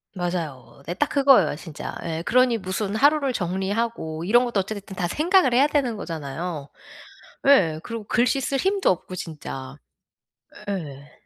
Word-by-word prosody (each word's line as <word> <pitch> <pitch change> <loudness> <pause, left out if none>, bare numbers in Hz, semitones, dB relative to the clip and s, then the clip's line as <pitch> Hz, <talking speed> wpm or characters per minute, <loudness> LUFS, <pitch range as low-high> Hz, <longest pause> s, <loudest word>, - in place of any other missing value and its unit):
맞아요. 165 -7 -4
네, 175 - -3
딱 285 - 0
그거예요 270 - +4
진짜. 160 -1 -8
예, 165 -1 -3
그러니 245 +2 +3
무슨 195 +2 -3
하루를 280 +2 +3
정리하고 190 -3 -2
이런 240 +6 +4
것도 235 -4 0
어찌 195 +3 -3
됐든 200 -1 -9
다 175 -1 -1
생각을 310 - +3
해야 265 +3 +6
되는 275 -6 0
거잖아요. 160 -2 -5 0.8
예. 165 - +5
그리고 230 -2 -6
글씨 245 +5 +2
쓸 275 +1 -1
힘도 385 +6 +2
없고 185 0 -3
진짜. 145 -6 -7 1.0
예. 145 -7 -5
195 Hz, 310 characters per minute, -24 LUFS, 165-250 Hz, 1.0 s, 해야